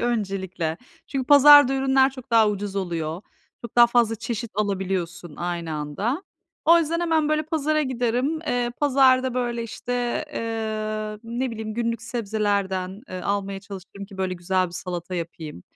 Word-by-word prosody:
öncelikle. 190 -8 -2 0.3
Çünkü 265 -2 -3
pazarda 290 -1 +8
ürünler 265 0 +3
çok 255 -2 -12
daha 225 -2 +5
ucuz 205 -1 -3
oluyor. 170 -2 -3 0.4
Çok 235 0 -9
daha 240 0 +9
fazla 235 -2 +2
çeşit 230 0 -4
alabiliyorsun 185 -5 -2
aynı 170 -2 -3
anda. 155 - -2 0.4
O 335 +1 +7
yüzden 335 +1 0
hemen, 320 -3 +1
böyle, 310 0 +1
pazara 310 -1 0
giderim. 255 +3 -1
Eee, 245 -1 0
pazarda, 260 -3 +4
böyle, 240 -2 -1
işte, 245 +3 -3
eee, 215 -2 -3
ne 240 +3 -2
bileyim, 220 -1 -5
günlük 230 -1 -2
sebzelerden, 205 -4 -2
eee, 185 - -6
almaya 200 0 -2
çalışırım 200 0 -9
ki, 195 -1 -13
böyle, 185 -1 -1
güzel 185 +1 0
bir 170 - -12
salata 180 0 -5
yapayım. 165 - -6
220 Hz, 150 wpm, -24 LUFS, 190-255 Hz, 0.4 s, daha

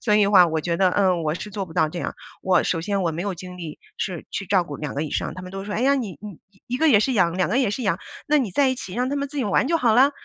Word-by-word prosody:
所 210 - +2
以 210 - +5
的 200 - +1
话， 185 -3 +7
我 160 -1 -1
觉 170 +1 -1
得， 185 +1 +3
嗯， 185 -3 +2
我 155 -1 0
是 210 +4 -7
做 200 -1 -3
不 165 - -12
到 160 -1 +2
这 175 - -6
样， - - -4 0.3
我 185 -1 +3
首 165 - -1
先 200 +3 -1
我 170 - +1
没 170 - -3
有 200 -1 -2
精 180 +1 -9
力 165 -4 -7 0.2
是 180 -5 -4
去 195 - -4
照 185 -1 +3
顾 145 -3 -7
2 150 -1 -5
个 145 - -1
以 155 - -4
上， - - -2
他 185 - -8
们 180 - -8
都 195 0 -5
说， 205 0 -5
哎 - - -1
呀， 275 +3 +4
你 230 -9 -4
你 205 -4 -9 0.3
1 245 - -2
个 320 +4 +3
也 230 -8 +6
是 260 +5 +1
养， 175 -6 +2
2 185 - +1
个 220 - 0
也 255 -7 +2
是 230 +5 -3
养， 190 -6 0 0.3
那 300 0 +3
你 245 -8 -1
在 270 +9 +3
一 260 - +1
起 185 -7 -8
让 250 +2 0
他 280 - -2
们 280 0 -2
自 290 - -10
己 265 - 0
玩 205 +5 +2
就 335 - +3
好 235 -8 +3
了， 265 +4 +6
195 Hz, 350 characters per minute, -23 LUFS, 175-240 Hz, 0.3 s, 话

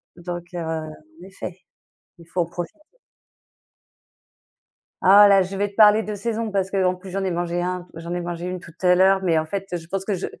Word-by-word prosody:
donc, 175 0 -6
heu, - - -2
en 155 0 -6
effet, 190 -1 -8 0.6
il 170 - -15
faut 180 +1 -1
en 170 - 0
profiter. 175 - -7 2.2
Ah 200 +2 +8
là, 195 -1 +6
je 190 +1 -3
vais 205 +1 0
te 200 - -21
parler 215 0 +6
de 210 -1 -4
saison, 225 +1 -3
parce 195 -1 -1
qu'en 185 -2 +1
plus 185 +1 -11
j'en 195 +1 -2
ai 185 - 0
mangé 175 0 -2
un, 180 0 -3
j'en 170 +1 -6
ai 175 - -2
mangé 175 0 -5
une 180 0 -4
tout 165 - -12
à 180 -1 +5
l'heure, 190 +1 +4
mais 165 -3 +2
en 155 - +1
fait, 195 +4 -4
je 165 -1 -7
pense 195 +1 -3
que 210 - -1
je 180 - -4
180 Hz, 215 wpm, -23 LUFS, 175-195 Hz, 2.2 s, Ah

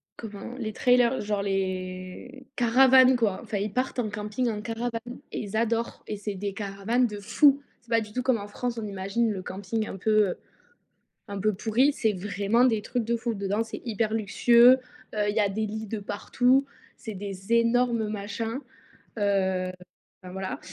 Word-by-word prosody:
comment, 215 +1 -8
les 220 -4 -4
trailers, 245 0 +3
genre 205 -1 -1
les 185 +6 -4
caravanes, 260 +2 +6
quoi. 220 -6 +1
Enfin 220 -3 -4
ils 200 +1 -3
partent 255 +1 -1
en 215 -3 0
camping 210 +4 -2
en 210 -1 -3
caravane 230 +2 -4
et - - -3
ils 210 0 -4
adorent 230 +1 -1
et 210 - -4
c'est 205 0 -4
des 200 +1 -4
caravanes 205 +5 0
de 210 -2 -7
fou. 280 +7 +4 0.2
C'est 235 - -26
pas 230 -1 +3
du 210 -1 -9
tout 250 - -1
comme 255 -2 +2
en 205 - -7
France 240 +3 -4
on 220 - -3
imagine 200 +4 -1
le 190 -2 -4
camping 205 +4 -3
un - - -6
peu 210 -1 +2 0.9
un 200 -1 -5
peu 215 +1 +1
pourri, 235 +8 +2
c'est 220 -5 +1
vraiment 205 +5 +1
des 220 -4 +1
trucs 245 +1 -2
de 235 +1 0
fou 230 0 -2
dedans, 200 +2 -1
c'est 225 - -8
hyper 220 -1 -1
luxueux, 235 +4 +6 0.4
heu, 210 -1 0
il - - -5
y 225 - +2
a 205 - +3
des 215 +2 -2
lits 220 +1 -5
de 220 - -3
partout, 250 +6 +1 0.3
c'est 220 - -7
des 195 +2 -6
énormes 235 -1 +3
machins, 215 +4 -4 0.6
heu, 190 -2 +1 0.5
enfin, 180 - -9
voilà. 190 0 -4
215 Hz, 185 wpm, -27 LUFS, 200-235 Hz, 0.9 s, caravanes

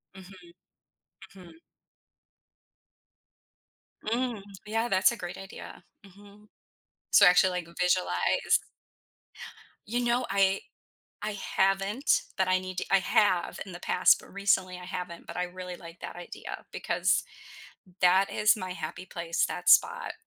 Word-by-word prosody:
Mhm. 185 -2 -14 0.8
Mhm. 175 -3 -14 2.5
Mm, 235 -1 -1 0.2
yeah, 225 +2 -1
that's 190 +1 +4
a 235 - -6
great 180 -1 -7
idea. 195 0 -10 0.2
Mhm. 205 +2 -17 0.6
So 200 - +7
actually, 180 +1 +5
like, 165 - -17
visualize 90 - +2 1.3
You 240 +3 -1
know, 240 +1 +1
I 195 0 +2 0.6
I 210 0 -2
haven't, 195 +6 +1 0.2
but 190 - +2
I 185 - +3
need 185 -1 -7
to - - -1
I 195 - +6
have 185 -1 +1
in 190 - -9
the 175 - -9
past, 180 - +4
but - - -16
recently 190 -2 +1
I 180 - -10
haven't, 180 -2 -6
but - - -8
I 180 - 0
really 180 0 -8
like 170 0 -13
that - - -7
idea 175 - -8
because - - 0 0.8
that 185 +2 +4
is 215 +2 +3
my 185 -3 -6
happy 180 +1 -6
place, 170 -2 -1
that - - -2
spot. - - +4
185 Hz, 135 wpm, -28 LUFS, 180-205 Hz, 2.5 s, So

